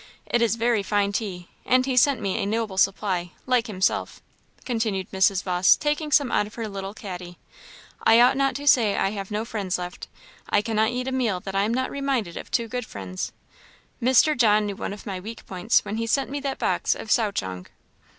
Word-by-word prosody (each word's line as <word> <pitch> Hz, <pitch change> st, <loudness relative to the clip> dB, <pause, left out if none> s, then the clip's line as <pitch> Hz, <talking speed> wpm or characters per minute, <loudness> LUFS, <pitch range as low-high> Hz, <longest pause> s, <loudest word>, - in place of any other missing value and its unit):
It 240 Hz, -, +1 dB
is 230 Hz, -1 st, +2 dB
very 230 Hz, -1 st, +1 dB
fine 200 Hz, 0 st, 0 dB
tea; 190 Hz, -5 st, -4 dB, 0.2 s
and 255 Hz, 0 st, +3 dB
he 265 Hz, -1 st, -1 dB
sent 265 Hz, 0 st, +4 dB
me 200 Hz, +2 st, -1 dB
a -, -, -1 dB
noble 215 Hz, -3 st, -1 dB
supply, 185 Hz, -3 st, 0 dB
like 250 Hz, -2 st, +2 dB
himself," 190 Hz, -3 st, -1 dB, 0.5 s
continued 220 Hz, -6 st, -2 dB
Mrs. 190 Hz, -1 st, +2 dB
Vawse, 180 Hz, -1 st, +4 dB
taking 300 Hz, 0 st, -1 dB
some 280 Hz, -4 st, +3 dB
out 205 Hz, -, +1 dB
of 215 Hz, -, -14 dB
her 230 Hz, -2 st, -4 dB
little 195 Hz, 0 st, -6 dB
caddy. 180 Hz, -4 st, -8 dB, 0.7 s
"I 225 Hz, +1 st, +6 dB
ought 250 Hz, +2 st, +6 dB
not 275 Hz, -1 st, +1 dB
to 285 Hz, +2 st, -5 dB
say 225 Hz, -7 st, +4 dB
I 195 Hz, -, +1 dB
have 195 Hz, -2 st, -5 dB
no 210 Hz, +1 st, -2 dB
friends 200 Hz, -6 st, -2 dB
left; 180 Hz, 0 st, -7 dB, 0.4 s
I 205 Hz, -, +2 dB
cannot 220 Hz, -1 st, +1 dB
eat 250 Hz, +1 st, -3 dB
a -, -, -1 dB
meal 235 Hz, -8 st, 0 dB
that 195 Hz, -, -6 dB
I 195 Hz, +1 st, +2 dB
am 220 Hz, -, -1 dB
not 260 Hz, 0 st, -1 dB
reminded 270 Hz, -10 st, -2 dB
of -, -, -7 dB
two 235 Hz, -, 0 dB
good 245 Hz, 0 st, -5 dB
ones. 95 Hz, -2 st, -5 dB, 0.7 s
Mr. 260 Hz, +5 st, +4 dB
John 215 Hz, -3 st, +4 dB
knew 200 Hz, -1 st, -3 dB
one -, -, -4 dB
of 205 Hz, -, -9 dB
my 190 Hz, -3 st, -4 dB
weak 220 Hz, +5 st, -9 dB
points 190 Hz, +5 st, +1 dB
when 215 Hz, -, -4 dB
he 230 Hz, 0 st, -2 dB
sent 270 Hz, +3 st, 0 dB
me 285 Hz, -, -2 dB
that 275 Hz, -1 st, -3 dB
box -, -, 0 dB
of 220 Hz, -, -7 dB
souchong." 95 Hz, -, 0 dB
215 Hz, 210 wpm, -24 LUFS, 195-245 Hz, 0.7 s, I